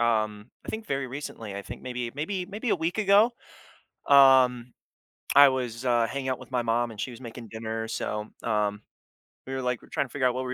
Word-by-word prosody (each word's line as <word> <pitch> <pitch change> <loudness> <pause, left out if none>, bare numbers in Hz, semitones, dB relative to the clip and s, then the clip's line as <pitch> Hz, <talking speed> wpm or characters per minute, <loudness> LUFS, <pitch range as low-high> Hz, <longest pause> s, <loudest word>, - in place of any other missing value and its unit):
um, 110 -1 0 0.2
I - - -16
think 220 0 -5
very 135 -1 -1
recently, 120 -6 -7
I 100 - -5
think - - -9
maybe 125 -2 -4
maybe 180 +5 -3
maybe 215 +3 -4
a - - +3
week 170 +5 -2
ago, 210 +3 +5 0.8
um, 130 -3 +6 0.6
I 140 0 +10
was, 125 -2 -3
uh, 120 -2 +3
hanging 135 0 -3
out 130 - -2
with - - -13
my 125 -1 +1
mom 120 0 0
and 105 - -12
she 130 - -2
was 120 +2 -11
making 115 -1 -9
dinner, 110 0 -4
so, 105 -1 -3 0.2
um, 105 -2 0 0.7
we 135 - -5
were 130 - -2
like 125 -2 -1
we're - - -18
trying - - 0
to - - -25
figure 140 -3 -1
out 125 - +1
what 130 0 -2
we 125 - -3
125 Hz, 220 wpm, -27 LUFS, 115-140 Hz, 0.8 s, I